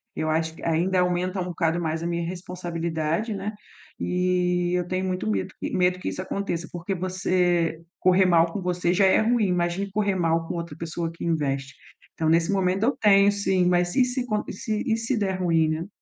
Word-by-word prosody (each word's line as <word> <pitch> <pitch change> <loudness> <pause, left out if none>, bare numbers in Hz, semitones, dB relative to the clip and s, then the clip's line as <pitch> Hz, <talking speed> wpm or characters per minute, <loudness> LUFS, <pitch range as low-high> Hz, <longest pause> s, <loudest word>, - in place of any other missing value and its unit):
Eu 155 - -1
acho 160 +1 0
que - - -13
ainda 175 +3 +1
aumenta 180 +1 0
um 180 - -1
bocado 170 -1 0
mais 160 -1 -2
a 170 - -2
minha 170 -1 -2
responsabilidade, 170 +1 -3
né. 205 +2 -4 0.5
E 180 -1 +1
eu 180 -1 0
tenho 185 +1 -1
muito 185 -11 -2
medo 100 -3 -2
que - - -4
medo 180 0 +2
que - - -3
isso - - -4
aconteça, 185 -3 -3
porque 175 +3 -4
você 180 -2 0 0.2
correr 185 +1 +4
mal 170 -2 +4
com 200 - -4
você 180 -1 0
já 195 +2 +4
é 190 - +5
ruim, 230 0 +2
imagine 180 +2 0
correr 200 0 0
mal 165 -2 +1
com - - -4
outra 170 -3 -5
pessoa 165 +1 -4
que 170 - -9
investe. 140 -5 -1 0.4
Então 160 - -2
nesse 165 +3 +3
momento 190 0 +1
eu 260 +5 +1
tenho 200 -1 +5
sim, 190 -3 +1
mas 175 0 +2
e 265 - +5
se 250 0 -2
co 215 -3 -1
e - - -5
se 215 -1 -3
e 220 - +3
se 230 +3 -1
der 190 -3 -1
ruim, 165 -3 +2
né. 160 +3 -2
180 Hz, 210 wpm, -25 LUFS, 165-190 Hz, 0.5 s, é